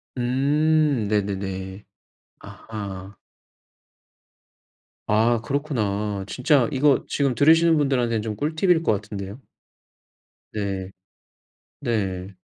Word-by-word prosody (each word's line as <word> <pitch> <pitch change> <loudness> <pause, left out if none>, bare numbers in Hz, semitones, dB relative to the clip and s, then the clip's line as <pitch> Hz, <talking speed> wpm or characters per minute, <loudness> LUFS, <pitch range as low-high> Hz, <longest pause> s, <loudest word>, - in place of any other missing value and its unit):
음. 140 0 +2
네네네. 95 -1 -3 0.6
아하. 100 -3 -8 1.9
아. 115 +2 +3
그렇구나. 105 -8 -2
진짜 130 +2 +2
이거 135 -1 +3
지금 140 -3 0
들으시는 160 +5 +5
분들한테는 125 -6 +1
좀 105 -1 -4
꿀팁일 160 - +1
것 - - +2
같은데요. 100 +1 -6 1.1
네. 95 -3 -3 0.9
네. 100 -7 -2
115 Hz, 180 characters per minute, -23 LUFS, 100-145 Hz, 1.9 s, 들으시는